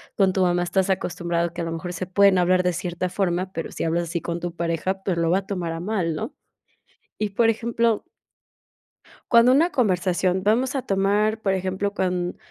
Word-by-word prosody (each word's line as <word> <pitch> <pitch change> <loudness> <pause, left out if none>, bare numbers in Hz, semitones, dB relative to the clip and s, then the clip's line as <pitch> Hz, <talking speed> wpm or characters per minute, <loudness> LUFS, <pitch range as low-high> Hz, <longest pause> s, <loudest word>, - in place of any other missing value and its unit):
con 195 -2 +3
tu 190 0 +1
mamá 175 0 +2
estás 185 +2 0
acostumbrado, 170 -2 -1
que 175 - -8
a - - -3
lo 165 - -3
mejor 175 +2 -5
se 180 +1 -4
pueden 195 0 +4
hablar 180 +1 +3
de 180 - +2
cierta 180 +1 -3
forma, 185 -1 -1
pero 165 - -5
si - - -4
hablas 170 +1 0
así 170 0 -3
con 170 +1 -3
tu 175 0 -5
pareja, 170 +3 -2
pues 180 -4 -1
lo 165 -1 +1
va 190 - +3
a 195 - -11
tomar 180 -5 -3
a 165 - -5
mal, 180 -5 -1
¿no? 155 - -5 0.9
Y, 210 -1 -1
por 225 +3 +3
ejemplo 230 0 0 1.3
cuando 235 +1 +7
una 325 +7 +4
conversación, 185 -4 +1
vamos 235 +7 +1
a 265 - -1
tomar, 205 +3 +1
por 195 -2 +1
ejemplo, 190 +2 -2
con 180 -2 -1
185 Hz, 200 wpm, -23 LUFS, 175-200 Hz, 1.3 s, cuando